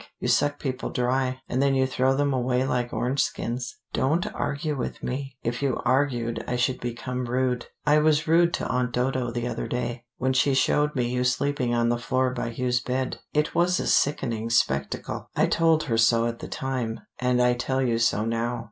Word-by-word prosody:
You -, -, -2 dB
suck 145 Hz, 0 st, +2 dB
people 130 Hz, -2 st, -3 dB
dry, 130 Hz, +1 st, 0 dB
and 130 Hz, -, 0 dB
then 140 Hz, -1 st, +3 dB
you 130 Hz, 0 st, +3 dB
throw 130 Hz, 0 st, +1 dB
them 140 Hz, 0 st, +1 dB
away 125 Hz, 0 st, +1 dB
like 125 Hz, -2 st, -1 dB
orange 130 Hz, +3 st, 0 dB
skins. 125 Hz, +2 st, -3 dB, 0.2 s
Don't 155 Hz, +7 st, +1 dB
argue 150 Hz, +1 st, -2 dB
with 130 Hz, -, -5 dB
me: 135 Hz, 0 st, -4 dB
if 120 Hz, +3 st, -2 dB
you 140 Hz, -2 st, 0 dB
argued 120 Hz, -4 st, +1 dB
I 125 Hz, -, -1 dB
should 125 Hz, +1 st, 0 dB
become 125 Hz, +1 st, -4 dB
rude. 125 Hz, 0 st, -1 dB, 0.2 s
I 150 Hz, +1 st, +5 dB
was 155 Hz, +1 st, +2 dB
rude 170 Hz, +2 st, +4 dB
to -, -, -3 dB
Aunt 125 Hz, -1 st, -1 dB
Dodo 125 Hz, 0 st, 0 dB
the 120 Hz, 0 st, -3 dB
other 120 Hz, -1 st, -3 dB
day, 120 Hz, -1 st, -3 dB
when 130 Hz, +1 st, 0 dB
she 135 Hz, +1 st, +3 dB
showed 150 Hz, +2 st, +2 dB
me 125 Hz, -2 st, +1 dB
you 125 Hz, +1 st, 0 dB
sleeping 125 Hz, -1 st, 0 dB
on 120 Hz, 0 st, +2 dB
the 120 Hz, 0 st, 0 dB
floor 130 Hz, +2 st, 0 dB
by 120 Hz, -2 st, -3 dB
Hugh's 125 Hz, +1 st, 0 dB
bed. 130 Hz, +1 st, -2 dB
It 150 Hz, +1 st, 0 dB
was 180 Hz, +1 st, +2 dB
a -, -, -2 dB
sickening 115 Hz, -6 st, +1 dB
spectacle: 70 Hz, -, -1 dB
I -, -, +4 dB
told 165 Hz, -1 st, +3 dB
her 115 Hz, -1 st, 0 dB
so 115 Hz, 0 st, +4 dB
at 115 Hz, 0 st, -3 dB
the -, -, -7 dB
time, 125 Hz, -4 st, -3 dB, 0.2 s
and 125 Hz, 0 st, +2 dB
I 125 Hz, 0 st, +4 dB
tell 130 Hz, +2 st, -1 dB
you 115 Hz, -2 st, +1 dB
so 115 Hz, -2 st, +2 dB
now." 115 Hz, +1 st, -1 dB
125 Hz, 200 wpm, -25 LUFS, 120-135 Hz, 0.2 s, I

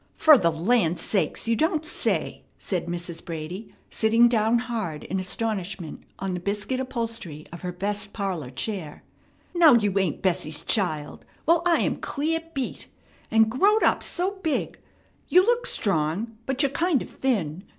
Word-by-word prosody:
"Fer 310 Hz, -1 st, +7 dB
the 175 Hz, -10 st, +3 dB
land 175 Hz, +1 st, +1 dB
sakes! 205 Hz, +2 st, 0 dB
You 230 Hz, -, +3 dB
don't 315 Hz, -, +1 dB
say," -, -, -1 dB, 0.2 s
said 180 Hz, -3 st, -3 dB
Mrs. 175 Hz, -1 st, -4 dB
Brady, 170 Hz, +6 st, -6 dB, 0.2 s
sitting 230 Hz, +2 st, +4 dB
down 225 Hz, 0 st, +2 dB
hard 225 Hz, -10 st, -3 dB
in 190 Hz, +3 st, -3 dB
astonishment 185 Hz, -3 st, -3 dB, 0.2 s
on 195 Hz, -1 st, -3 dB
the 180 Hz, -, -2 dB
biscuit 205 Hz, +7 st, -2 dB
upholstery 230 Hz, -, -4 dB
of 170 Hz, -, -8 dB
her 180 Hz, -, -3 dB
best 200 Hz, +3 st, -2 dB
parlor 185 Hz, -, -3 dB
chair. 155 Hz, -, -5 dB, 0.5 s
"Now 330 Hz, -7 st, +7 dB
you 205 Hz, -4 st, +2 dB
ain't 185 Hz, -3 st, -1 dB
Bessie's 165 Hz, -5 st, 0 dB
child! 155 Hz, -9 st, 0 dB, 0.2 s
Well, 335 Hz, +1 st, +4 dB
I 340 Hz, -, +4 dB
am -, -, 0 dB
clear 315 Hz, +3 st, -1 dB, 0.2 s
beat. 270 Hz, -2 st, -4 dB, 0.4 s
And 220 Hz, 0 st, +5 dB
growed 410 Hz, -, +3 dB
up -, -, +3 dB
so 380 Hz, +3 st, -2 dB
big! 320 Hz, -4 st, -2 dB, 0.5 s
You 365 Hz, -, +6 dB
look 485 Hz, +2 st, +2 dB
strong, 195 Hz, +5 st, 0 dB
but 270 Hz, +2 st, 0 dB
you're 275 Hz, -, +1 dB
kind 330 Hz, -2 st, +1 dB
of -, -, -12 dB
thin. 190 Hz, -, -1 dB
210 Hz, 160 wpm, -25 LUFS, 175-260 Hz, 0.5 s, Fer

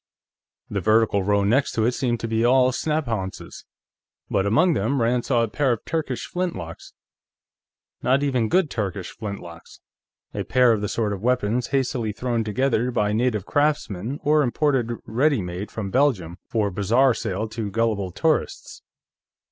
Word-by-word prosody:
The 100 Hz, -, -3 dB
vertical 110 Hz, +1 st, +3 dB
row 100 Hz, +1 st, +2 dB
next 120 Hz, +8 st, +2 dB
to 110 Hz, -, +1 dB
it 120 Hz, -, +3 dB
seemed 120 Hz, -2 st, -1 dB
to 115 Hz, -, -2 dB
be 110 Hz, 0 st, 0 dB
all 130 Hz, +1 st, +4 dB
snaphaunces, 120 Hz, -10 st, -3 dB, 0.7 s
but 95 Hz, +1 st, +1 dB
among 170 Hz, -, +3 dB
them 140 Hz, -2 st, 0 dB
Rand 120 Hz, +1 st, +1 dB
saw 120 Hz, -4 st, +2 dB
a -, -, 0 dB
pair 135 Hz, +4 st, 0 dB
of 115 Hz, -, -7 dB
Turkish 155 Hz, -6 st, -3 dB
flintlocks. 175 Hz, -, -5 dB, 1.1 s
Not 135 Hz, +3 st, +2 dB
even 125 Hz, -6 st, +1 dB
good 180 Hz, -5 st, +2 dB
Turkish 100 Hz, -4 st, -3 dB
flintlocks; 95 Hz, -6 st, -8 dB, 0.5 s
a -, -, -3 dB
pair 125 Hz, -1 st, +4 dB
of 110 Hz, -2 st, +1 dB
the 105 Hz, -, -2 dB
sort 110 Hz, -3 st, -1 dB
of 95 Hz, -, -6 dB
weapons 120 Hz, 0 st, 0 dB
hastily 125 Hz, -5 st, -1 dB
thrown 120 Hz, 0 st, -1 dB
together 120 Hz, +2 st, 0 dB
by 105 Hz, -4 st, 0 dB
native 110 Hz, -3 st, 0 dB
craftsmen 140 Hz, -5 st, -1 dB
or 150 Hz, +1 st, +4 dB
imported 135 Hz, -2 st, +1 dB
ready 135 Hz, +4 st, +2 dB
made 90 Hz, +2 st, -5 dB
from 100 Hz, -3 st, -5 dB
Belgium 105 Hz, -, +1 dB
for 105 Hz, -3 st, 0 dB
bazaar 115 Hz, +8 st, +3 dB
sale 105 Hz, +1 st, -3 dB
to 110 Hz, -2 st, -4 dB
gullible 105 Hz, -3 st, 0 dB
tourists. 155 Hz, -, -1 dB
115 Hz, 155 wpm, -23 LUFS, 105-130 Hz, 1.1 s, all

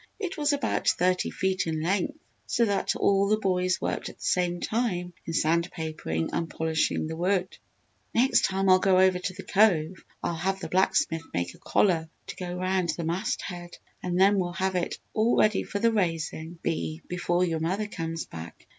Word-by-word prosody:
It 385 Hz, -3 st, -4 dB
was 295 Hz, -1 st, +1 dB
about 285 Hz, -1 st, -1 dB
thirty 180 Hz, +1 st, +2 dB
feet 190 Hz, -1 st, -1 dB
in 160 Hz, -1 st, -1 dB
length 195 Hz, -, 0 dB, 0.3 s
so 235 Hz, -, +2 dB
that 200 Hz, -3 st, 0 dB
all 200 Hz, 0 st, +3 dB
the 215 Hz, +1 st, +3 dB
boys 185 Hz, -3 st, +1 dB
worked -, -, -2 dB
at -, -, -13 dB
the -, -, -8 dB
same 175 Hz, -1 st, +1 dB
time 180 Hz, -7 st, -1 dB
in 165 Hz, -, -3 dB
sand 170 Hz, +2 st, +2 dB
papering 155 Hz, -, -3 dB
and 165 Hz, -1 st, -1 dB
polishing 160 Hz, -1 st, 0 dB
the 160 Hz, +1 st, -4 dB
wood. 185 Hz, +2 st, 0 dB, 0.6 s
"Next 255 Hz, +4 st, +3 dB
time 195 Hz, 0 st, 0 dB
I 185 Hz, 0 st, +7 dB
go 190 Hz, -1 st, +4 dB
over 185 Hz, -1 st, +4 dB
to 185 Hz, +1 st, -3 dB
the 195 Hz, -, -9 dB
Cove 185 Hz, -5 st, +2 dB, 0.2 s
I'll -, -, 0 dB
have 190 Hz, +4 st, -1 dB
the -, -, -6 dB
blacksmith 170 Hz, -3 st, +2 dB
make 85 Hz, 0 st, -1 dB
a -, -, -18 dB
collar 165 Hz, -5 st, +2 dB, 0.2 s
to -, -, -7 dB
go 180 Hz, -, -5 dB
around 185 Hz, -1 st, 0 dB
the 170 Hz, -, -3 dB
mast 180 Hz, +8 st, -1 dB
head, 175 Hz, -2 st, -7 dB, 0.2 s
and 180 Hz, 0 st, -1 dB
then 200 Hz, +1 st, +5 dB
we'll 175 Hz, -1 st, -1 dB
have 190 Hz, +1 st, -1 dB
it 180 Hz, -1 st, -1 dB, 0.2 s
all 220 Hz, +2 st, +2 dB
ready 215 Hz, -2 st, +4 dB
for -, -, -4 dB
the 230 Hz, +3 st, +3 dB
raisin' 165 Hz, -3 st, -2 dB
bee 160 Hz, -1 st, -2 dB
before 175 Hz, 0 st, 0 dB
your 165 Hz, -2 st, -1 dB
mother 185 Hz, +6 st, -1 dB
comes 165 Hz, -5 st, -4 dB
back." 80 Hz, +1 st, -10 dB
180 Hz, 195 wpm, -27 LUFS, 165-195 Hz, 0.6 s, I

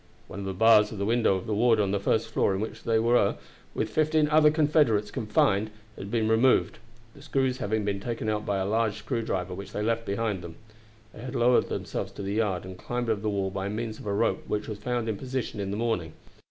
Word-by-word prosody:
One 100 Hz, -, -8 dB
of 100 Hz, -, -5 dB
the 95 Hz, -, -3 dB
bars 105 Hz, 0 st, +5 dB
of 110 Hz, -, -7 dB
the 100 Hz, -, -1 dB
window 115 Hz, -2 st, +2 dB
of 95 Hz, -, -4 dB
the 110 Hz, -, -2 dB
ward 115 Hz, +2 st, +3 dB
on 100 Hz, -2 st, +1 dB
the 100 Hz, -, 0 dB
first 110 Hz, +3 st, 0 dB
floor 95 Hz, -, +1 dB
in -, -, -2 dB
which 110 Hz, -, -6 dB
they 115 Hz, -1 st, +2 dB
were, 115 Hz, +2 st, +3 dB, 0.4 s
with 110 Hz, -, -2 dB
fifteen 155 Hz, +2 st, +2 dB
other 150 Hz, 0 st, +6 dB
Confederate 150 Hz, -6 st, +3 dB
officers, -, -, -13 dB
confined, 105 Hz, -1 st, +1 dB, 0.3 s
had 100 Hz, -, -8 dB
been 110 Hz, 0 st, 0 dB
removed; 110 Hz, +1 st, +3 dB, 0.3 s
the 140 Hz, -, -15 dB
screws 135 Hz, -3 st, 0 dB
having 105 Hz, 0 st, -1 dB
been 100 Hz, -1 st, -1 dB
taken 115 Hz, +1 st, -4 dB
out 105 Hz, -1 st, -1 dB
by 100 Hz, -2 st, -1 dB
a 95 Hz, -, -1 dB
large 110 Hz, +1 st, +1 dB
screw 115 Hz, +3 st, -3 dB
driver 90 Hz, -4 st, -3 dB
which 100 Hz, +2 st, -8 dB
they 105 Hz, -, -2 dB
left 115 Hz, +1 st, -1 dB
behind 100 Hz, -2 st, -1 dB
them. 85 Hz, -1 st, -9 dB, 0.6 s
They -, -, -11 dB
had 125 Hz, 0 st, -6 dB
lowered 120 Hz, +1 st, +3 dB
themselves -, -, -4 dB
to -, -, -7 dB
the 100 Hz, +1 st, -3 dB
yard, 100 Hz, -5 st, 0 dB
and 95 Hz, 0 st, -9 dB
climbed 120 Hz, +1 st, -2 dB
over 105 Hz, -2 st, -1 dB
the 110 Hz, -, -1 dB
wall 100 Hz, -2 st, -1 dB
by 95 Hz, +1 st, -3 dB
means 110 Hz, +1 st, -4 dB
of -, -, -9 dB
a 100 Hz, -, 0 dB
rope 115 Hz, -, +1 dB
which 105 Hz, 0 st, -2 dB
was 105 Hz, -2 st, -6 dB
found 120 Hz, +1 st, -2 dB
in 110 Hz, -2 st, -2 dB
position 130 Hz, -3 st, -4 dB
in 100 Hz, -1 st, -3 dB
the 100 Hz, -, -3 dB
morning. 110 Hz, -9 st, -1 dB
110 Hz, 245 wpm, -27 LUFS, 100-120 Hz, 0.6 s, other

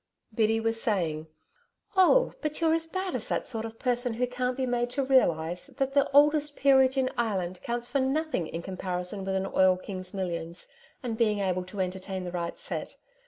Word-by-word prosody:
Biddy 225 Hz, 0 st, +2 dB
was 225 Hz, 0 st, -1 dB
saying: 160 Hz, -7 st, -1 dB, 0.7 s
'Oh, 385 Hz, +7 st, +5 dB
but 305 Hz, -1 st, -2 dB
you're 325 Hz, -1 st, +3 dB
as 325 Hz, 0 st, +1 dB
bad 375 Hz, +2 st, -3 dB
as 245 Hz, -4 st, -3 dB
that -, -, -1 dB
sort 225 Hz, -3 st, -3 dB
of 225 Hz, 0 st, -8 dB
person 245 Hz, -2 st, 0 dB
who 250 Hz, +2 st, +1 dB
can't 250 Hz, +1 st, -2 dB
be 260 Hz, -, 0 dB
made 245 Hz, -1 st, 0 dB
to 275 Hz, +3 st, -1 dB
realise 175 Hz, -10 st, +2 dB
that 270 Hz, -1 st, -2 dB
the 280 Hz, 0 st, +3 dB
oldest 295 Hz, +1 st, +4 dB
peerage 265 Hz, -1 st, +4 dB
in 260 Hz, -1 st, +2 dB
Ireland 185 Hz, -6 st, -1 dB
counts 240 Hz, 0 st, -3 dB
for 275 Hz, -, 0 dB
nothing 270 Hz, -, 0 dB
in 165 Hz, +1 st, -5 dB
comparison 185 Hz, +1 st, -4 dB
with 190 Hz, 0 st, -2 dB
an 190 Hz, 0 st, 0 dB
oil 185 Hz, -1 st, +4 dB
king's 185 Hz, -1 st, -6 dB
millions 170 Hz, -3 st, -4 dB, 0.4 s
and 230 Hz, -2 st, -3 dB
being 215 Hz, -3 st, +3 dB
able 185 Hz, -2 st, 0 dB
to 190 Hz, +1 st, -4 dB
entertain 185 Hz, +1 st, -3 dB
the 175 Hz, -, -5 dB
right 170 Hz, -1 st, -3 dB
set.... -, -, -5 dB
225 Hz, 195 wpm, -28 LUFS, 185-265 Hz, 0.7 s, Oh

